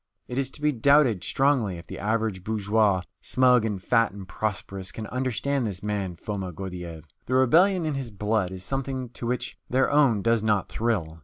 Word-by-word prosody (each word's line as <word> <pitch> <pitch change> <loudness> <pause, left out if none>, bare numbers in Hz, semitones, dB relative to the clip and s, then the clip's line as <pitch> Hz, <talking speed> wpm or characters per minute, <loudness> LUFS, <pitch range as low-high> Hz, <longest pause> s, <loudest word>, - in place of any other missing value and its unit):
It 125 - -3
is 135 -1 -1
to 150 - -14
be 150 - +4
doubted 135 -5 +4
strongly 130 -9 +1
if 85 - -11
the - - -8
average 110 -3 -1
bourgeois, 105 -2 +1 0.2
smug 125 -3 +3
and 105 -3 -2
fat 115 +3 +2
and 100 -2 -10
prosperous, 95 -3 -4
can 110 - -6
understand 130 +1 -1
this 100 -1 -6
man 100 -4 -2
Foma 95 +1 -5
Gordyeeff. 90 -3 -7 0.2
The 130 - 0
rebellion 170 +8 +4
in 155 - -1
his 135 -3 -4
blood 105 -1 0
is 95 0 -6
something 130 +2 -3
to 120 0 -7
which 125 +1 -3
their 130 +2 +2
own 135 -9 +3
does 115 -1 +3
not 105 -3 +1
thrill. 95 -9 -1
110 Hz, 185 wpm, -26 LUFS, 95-130 Hz, 0.2 s, be